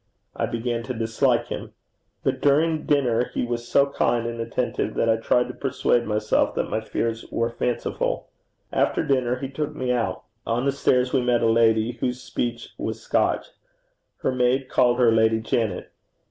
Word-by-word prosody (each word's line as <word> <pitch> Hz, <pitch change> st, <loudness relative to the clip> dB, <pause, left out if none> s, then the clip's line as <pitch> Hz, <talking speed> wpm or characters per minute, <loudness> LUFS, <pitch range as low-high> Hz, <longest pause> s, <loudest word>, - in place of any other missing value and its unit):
I -, -, -1 dB
began 115 Hz, 0 st, -2 dB
to 130 Hz, -, -4 dB
dislike 110 Hz, 0 st, +1 dB
him. -, -, -6 dB, 0.5 s
But -, -, 0 dB
during 155 Hz, +2 st, +2 dB
dinner 125 Hz, -5 st, +2 dB
he -, -, 0 dB
was 120 Hz, 0 st, -4 dB
so 140 Hz, -, +4 dB
kind 120 Hz, -4 st, 0 dB
and 115 Hz, 0 st, -3 dB
attentive 115 Hz, +2 st, -2 dB
that -, -, +1 dB
I 110 Hz, 0 st, +3 dB
tried 125 Hz, +2 st, +2 dB
to -, -, -5 dB
persuade 125 Hz, -3 st, 0 dB
myself 105 Hz, 0 st, +1 dB
that -, -, -2 dB
my 110 Hz, -, 0 dB
fears 115 Hz, +1 st, -3 dB
were 115 Hz, 0 st, 0 dB
fanciful. 120 Hz, +1 st, -2 dB, 0.5 s
After -, -, +1 dB
dinner 125 Hz, -3 st, +1 dB
he 135 Hz, +1 st, -4 dB
took 150 Hz, +2 st, -4 dB
me 130 Hz, -1 st, -1 dB
out. 120 Hz, -2 st, -1 dB, 0.2 s
On 120 Hz, +3 st, -1 dB
the 140 Hz, -, +3 dB
stairs 125 Hz, -2 st, +1 dB
we 135 Hz, -, +3 dB
met 120 Hz, -1 st, +2 dB
a 115 Hz, -, +4 dB
lady 115 Hz, +1 st, +2 dB
whose 125 Hz, +1 st, -1 dB
speech 120 Hz, -1 st, -4 dB
was -, -, -3 dB
Scotch. -, -, 0 dB, 0.7 s
Her -, -, +2 dB
maid 130 Hz, +1 st, +1 dB
called 120 Hz, -1 st, +3 dB
her 120 Hz, -2 st, +5 dB
Lady 110 Hz, 0 st, +3 dB
Janet. 110 Hz, 0 st, -2 dB
120 Hz, 175 wpm, -24 LUFS, 115-130 Hz, 0.7 s, her